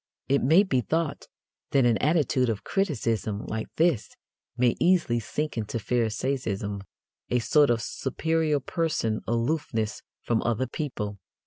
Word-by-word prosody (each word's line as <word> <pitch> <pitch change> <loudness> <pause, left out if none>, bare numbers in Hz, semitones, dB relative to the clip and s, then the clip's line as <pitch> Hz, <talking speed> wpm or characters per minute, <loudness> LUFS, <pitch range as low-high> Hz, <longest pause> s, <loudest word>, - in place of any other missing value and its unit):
It 140 +1 +2
may 160 +9 +6
be 135 -11 +1
thought 160 +2 -2 0.4
that 135 -2 +3
an 115 -2 +3
attitude 145 -5 +2
of 110 -3 -2
criticism 115 - -1
like 110 0 -3
this 160 -9 +2 0.5
may 125 -1 +3
easily 170 -10 +3
sink 150 +4 -3
into 110 +1 -3
Pharisaism 110 -3 -1 0.5
a 125 - +2
sort 145 +5 +4
of 115 -1 +1
"superior 155 +2 0
person" 135 -7 -1
aloofness 115 -2 -1 0.2
from 115 -2 +1
other 120 +2 0
people. 105 -7 -4
125 Hz, 130 wpm, -27 LUFS, 110-155 Hz, 0.5 s, may